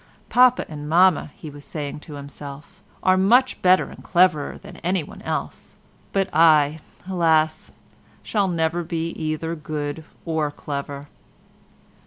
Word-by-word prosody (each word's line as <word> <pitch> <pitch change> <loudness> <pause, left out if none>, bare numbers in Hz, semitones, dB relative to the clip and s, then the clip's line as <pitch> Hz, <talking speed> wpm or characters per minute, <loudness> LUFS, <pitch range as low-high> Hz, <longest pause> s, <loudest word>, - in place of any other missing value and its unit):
"Papa 250 0 +5
and 150 -1 -7
Mamma," 180 0 +4
he 155 - -9
was 145 0 -12
saying 150 -1 -5
to 150 0 -10
himself, 145 +6 -10 0.2
"are 185 0 +4
much 240 +7 +3
better 185 0 +5
and - - -12
cleverer 180 -5 +2
than 195 -2 -12
anyone 180 -3 -3
else, - - -5 0.4
but, 195 -1 +1
I, 155 -1 +5 0.3
alas! 160 -4 +1 0.5
shall 205 -3 0
never 170 -1 0
be 165 -1 -3
either 160 0 -3
good 155 -1 -5 0.2
or 160 -3 0
clever." 140 -1 -6
160 Hz, 130 wpm, -23 LUFS, 150-185 Hz, 0.5 s, Papa